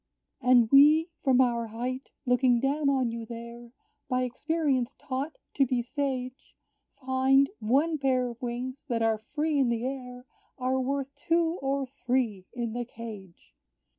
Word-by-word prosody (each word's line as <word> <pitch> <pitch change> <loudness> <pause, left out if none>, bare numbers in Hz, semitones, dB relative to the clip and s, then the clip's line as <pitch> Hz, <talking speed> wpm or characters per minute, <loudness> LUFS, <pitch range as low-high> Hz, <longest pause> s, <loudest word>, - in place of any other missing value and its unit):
"And 250 -2 +5
we, 305 +4 +6
from 260 -2 +4
our 235 -2 +1
height, 250 +4 -4 0.2
looking 250 -1 +3
down 280 +3 +1
on 260 -4 +1
you 230 0 -5
there, 235 +1 -9 0.4
By 255 0 +1
experience 270 -1 -1
taught 275 +4 -4 0.2
to 275 - +3
be 245 -1 0
sage, 260 -1 -4 0.5
Find, 265 +1 +4
one 290 +8 +1
pair 260 -2 +1
of 235 +1 -9
wings 250 +3 -4
that 235 -4 0
are 220 -1 +2 0.2
free 305 -1 +1
in 260 -3 +3
the 235 0 -1
air 250 -2 -6 0.3
Are 260 0 0
worth 275 +1 -2
two 330 +3 +1
or 275 0 0
three 250 -7 -2
in 235 -3 -4
the 240 +1 -2
cage! 215 -7 -11
255 Hz, 150 wpm, -28 LUFS, 240-275 Hz, 0.5 s, we